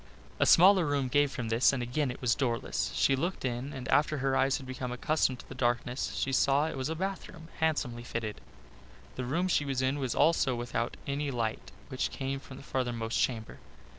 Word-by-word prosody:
A - - +3
smaller 185 +1 +7
room 140 -4 0
gave 145 +2 +3
from 120 -4 -4
this 115 +3 +4
and 130 -3 -2
again 130 +4 -1
it 125 - -7
was 120 -2 +3
doorless. 120 -3 -1
She 135 - +3
looked 170 +2 -2
in 125 +3 -3
and 130 -3 -6
after 150 +1 +3
her 135 0 0
eyes 135 0 +2
had 135 - -9
become 130 -1 -5
accustomed 130 +1 +1
to - - -20
the - - -8
darkness 125 +1 -1
she 135 - -1
saw 135 +2 +3
that 160 - -1
it - - -7
was 130 +2 -2
a 160 - -2
bathroom 180 -2 -5
handsomely 145 -7 0
fitted. 115 - -4 0.7
The 130 - -3
room 165 +9 0
she 170 - +2
was 135 -2 -1
in 135 +2 0
was 130 -3 -2
also 145 -4 +3
without 120 0 -3
any 140 +1 -2
light 115 -4 -3 0.2
which 130 -1 -1
came 135 0 -3
from 130 -1 -12
the - - -11
farthermost 120 -4 -2
chamber. 115 -4 -2
135 Hz, 210 wpm, -30 LUFS, 125-145 Hz, 0.7 s, smaller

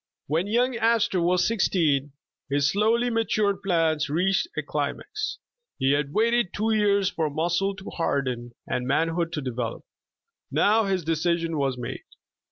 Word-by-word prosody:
WHEN 165 +6 0
young 245 +4 +1
Astor 230 -4 +2
was 180 +1 +2
sixteen, 155 -10 +1 0.4
his 140 +1 +2
slowly 230 +4 +2
ma 225 0 +2
tured 205 -3 0
plans 165 -6 +1
reached 190 - +1
a - - -1
climax. 425 +1 -3 0.4
He 135 -1 +2
had 145 0 0
waited 230 +1 +1
two 220 +2 +1
years 200 -2 +2
for 160 -5 -1
muscle 175 +6 0
to 200 0 -9
harden 125 -7 -2
and 125 0 -2
manhood 165 +4 0
to 150 - -2
develop. 125 -2 -4 0.7
Now 220 +1 +3
his 190 -3 0
decision 165 +1 0
was 135 -3 0
made. 120 -1 -5
175 Hz, 150 wpm, -25 LUFS, 145-210 Hz, 0.7 s, Now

